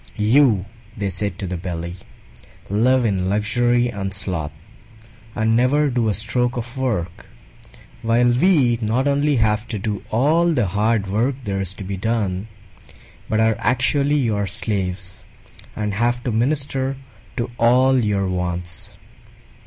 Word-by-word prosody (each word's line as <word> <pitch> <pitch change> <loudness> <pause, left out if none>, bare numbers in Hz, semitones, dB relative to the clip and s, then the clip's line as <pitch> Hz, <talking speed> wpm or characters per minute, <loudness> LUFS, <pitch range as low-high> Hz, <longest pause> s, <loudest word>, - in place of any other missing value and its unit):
"You," 110 -2 +4 0.3
they 100 -1 -1
said 95 +1 -3
to 95 - -4
the 90 -1 -3
Belly, 85 -1 -5 0.8
"live 125 +4 +3
in 95 -3 0
luxury 120 +4 +2
and 100 -3 -4
sloth, 90 -7 -2 0.9
and 110 0 +2
never 140 +4 +3
do 120 -3 +1
a - - +1
stroke 120 +4 -1
of 120 +2 -5
work; 105 -11 -3 0.7
while 115 +2 +3
we 125 -4 +3
not 115 +6 +1
only 145 +1 +2
have 110 -1 +1
to 110 - -4
do 105 0 -3
all 160 +9 +3
the 120 -7 +1
hard 105 +3 +1
work 115 +8 0
there 100 -2 -2
is 95 0 -4
to 100 - -8
be 95 +1 -4
done, 105 -2 -1 0.8
but 110 - +1
are 110 -1 +3
actually 140 +5 +2
your 105 -7 0
slaves 95 -2 -3 0.5
and 105 -1 -2
have 120 +3 0
to 125 - -1
minister 135 +2 0 0.4
to 120 0 -2
all 130 +3 +4
your 100 -2 0
wants. 90 -1 -3
110 Hz, 145 wpm, -21 LUFS, 100-125 Hz, 0.9 s, You